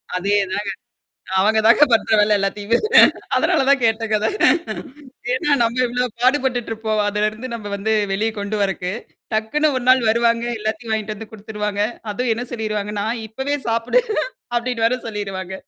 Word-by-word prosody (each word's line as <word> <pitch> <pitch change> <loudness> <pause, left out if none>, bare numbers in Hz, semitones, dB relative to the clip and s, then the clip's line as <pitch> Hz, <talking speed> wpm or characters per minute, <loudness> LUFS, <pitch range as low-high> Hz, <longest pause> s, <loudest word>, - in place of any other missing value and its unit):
அதேதாங்க. 200 +1 0 0.7
அவுங்க 220 +3 +3
தாங்க 295 - +7
பண்ற 225 - +2
வேல 210 0 +4
எல்லாத்தையுமே! 200 +3 0 0.6
அதனால - - +2
தான் 280 -1 +4
கேட்டேங்க 225 -1 +1
அத. 220 - +1 1.1
ஏன்னா 260 +3 -1
நம்ம 235 +2 0
எவ்ளோ 245 +1 -1 0.2
பாடுபட்டுட்டு 255 -2 +1
இருப்போம். 220 -1 -1
அதுலருந்து 215 +4 -2
நம்ம 205 -3 -6
வந்து 220 +2 0 0.2
வெளியே 220 +3 0
கொண்டு 200 +1 -3
வரக்கு. 185 -1 -2 0.4
டக்குன்னு 290 +8 +1
ஒரு 250 - -3
நாள் 255 0 +6
வருவாங்க. 235 0 +2
எல்லாத்தையும் 220 +1 -3
வாங்கிட்டு 215 -1 -3
வந்து 220 0 -10
குடுத்துருவாங்க. 210 -1 -3 0.3
அதுவும் 240 +2 0
என்ன 245 - -4
சொல்லிருவாங்கன்னா, 210 -2 -3 0.2
"இப்பவே 265 +6 -2
சாப்புடு." 230 - +2 0.5
அப்பிடின்னு 240 -1 0
வேற 250 +2 +1
சொல்லிருவாங்க. 195 -3 -5
220 Hz, 140 wpm, -20 LUFS, 205-240 Hz, 1.1 s, தாங்க